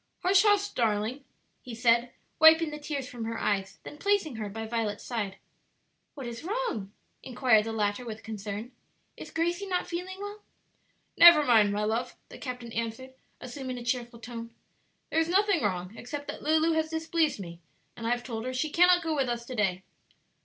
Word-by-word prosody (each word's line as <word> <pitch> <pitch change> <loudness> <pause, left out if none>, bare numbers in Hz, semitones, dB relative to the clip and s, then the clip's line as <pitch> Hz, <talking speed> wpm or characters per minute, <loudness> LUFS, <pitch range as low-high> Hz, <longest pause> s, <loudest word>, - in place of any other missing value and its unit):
"Hush, 370 +1 +5
hush, 410 -1 +3
darling!" 225 - -1 0.4
he 245 -2 -8
said, 235 +1 +3 0.3
wiping 320 0 +7
the 300 - -6
tears 285 -3 -4
from 235 -3 -6
her 230 0 -3
eyes, 195 -2 -1
then 295 - -10
placing 390 - +1
her 215 -2 -4
by 225 +2 -5
Violet's 220 -2 -2
side. 210 -6 -3 0.8
"What 275 -3 -7
is 235 0 -7
wrong?" 370 - -3 0.3
inquired 245 -4 +3
the 225 - -3
latter 210 +1 -1
with 225 -2 -7
concern; 215 +2 -6 0.4
"is - - -9
Gracie 345 +4 -1
not 360 -2 -1
feeling 360 +2 -5
well?" 410 +1 -7 0.8
"Never 340 -3 +9
mind, 220 -6 +5
my 205 +1 -1
love," 230 +4 -1
the - - -11
captain 250 -3 -6
answered, 230 +3 -4 0.3
assuming 255 0 -6
a 240 - -7
cheerful 240 0 -2
tone; 230 -1 -7 0.6
"there 320 - +2
is 325 +1 +1
nothing 395 -1 +3
wrong 185 -1 -2
except 285 +5 -7
that - - -6
Lulu 315 +2 +3
has 320 0 0
displeased 320 -3 0
me, 170 -3 -8 0.4
and 230 - -5
I - - +1
have 240 0 0
told 225 -3 -5
her 255 0 -3
she 300 +4 -1
cannot 355 +1 +5
go 320 -1 -1
with 270 -3 0
us 235 0 -3
to 255 - -7
day." 195 -5 0
250 Hz, 185 wpm, -28 LUFS, 225-320 Hz, 0.8 s, Never